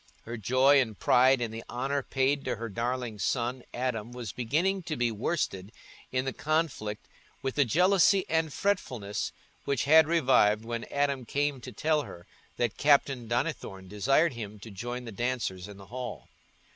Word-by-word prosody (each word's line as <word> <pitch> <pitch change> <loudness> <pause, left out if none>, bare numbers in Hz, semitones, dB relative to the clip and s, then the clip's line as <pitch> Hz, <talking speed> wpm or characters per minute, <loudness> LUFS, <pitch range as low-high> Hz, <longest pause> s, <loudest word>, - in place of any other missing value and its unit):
Her 115 - -6
joy 130 +5 +4
and 110 -5 -3
pride 130 +1 +4
in 115 -2 -2
the 115 +1 -7
honour 135 +3 -1
paid 135 +2 0
to - - -1
her 115 +1 -5
darling 115 0 -3
son 125 +3 -1
Adam 120 -3 -3
was 120 -5 -6
beginning 160 - 0
to 155 - -2
be 120 -1 +1
worsted 105 - -2 0.4
in 130 0 0
the 135 - -2
conflict 150 -9 -2 0.4
with 135 -1 -1
the 145 - +3
jealousy 185 - +4
and 160 -1 +1
fretfulness 125 - -2 0.3
which 140 -3 0
had 160 +1 +6
revived 125 -9 +3
when 115 0 -4
Adam 140 -2 0
came 145 +1 -1
to 125 - -8
tell 150 +6 +1
her 85 -10 -10 0.3
that 120 -3 -1
Captain 140 -4 +3
Donnithorne 120 - -3
desired 135 - +2
him 105 -3 -7
to 110 - -9
join 120 +5 -5
the 115 - -7
dancers 110 -5 -2
in 100 -1 -11
the 100 - -12
hall. 125 0 -6
125 Hz, 170 wpm, -29 LUFS, 115-145 Hz, 0.4 s, had